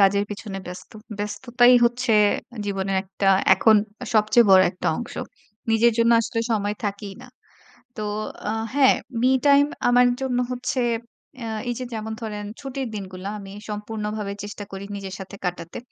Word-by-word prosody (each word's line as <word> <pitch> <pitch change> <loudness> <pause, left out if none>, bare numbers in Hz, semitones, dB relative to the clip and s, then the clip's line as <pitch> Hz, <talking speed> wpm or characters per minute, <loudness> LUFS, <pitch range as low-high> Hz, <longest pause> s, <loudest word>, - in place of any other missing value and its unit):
কাজের 200 +1 +4
পেছনে 205 -1 -6
ব্যস্ত। 180 0 -9 0.3
ব্যস্ততাই 240 +4 +3
হচ্ছে 240 0 +1 0.5
জীবনের 195 -1 -1
একটা 195 0 -1 0.3
এখন 220 -1 +5 0.4
সবচেয়ে 215 +3 +5
বড় 190 -1 +8
একটা 180 - -3
অংশ। 240 - -6 0.6
নিজের 225 +1 +4
জন্য 230 0 +4
আসলে 230 0 -2
সময় 205 -1 0
থাকেই 200 -1 -4
না। - - -12 0.7
তো 215 - -4 0.5
আ - - +1 0.2
হ্যাঁ 275 -2 +6 0.3
মি 255 - +4 0.2
টাইম 285 0 +6 0.2
আমার 245 0 +5
জন্য 255 -2 -1
হচ্ছে 250 +1 -2 0.6
এ্যা 230 - -4 0.2
এই 240 - -1
যে 255 - -4
যেমন 220 0 -4
ধরেন 210 -2 -5 0.2
ছুটির 270 -2 -4
দিনগুলা 190 -2 -6
আমি 195 -1 -10 0.2
সম্পূর্ণভাবে 210 -1 -4
চেষ্টা 205 0 -7
করি 195 +1 -6
নিজের 195 -1 -6
সাথে 190 +1 -8
কাটাতে। 175 -2 -4
210 Hz, 150 wpm, -23 LUFS, 195-240 Hz, 0.7 s, বড়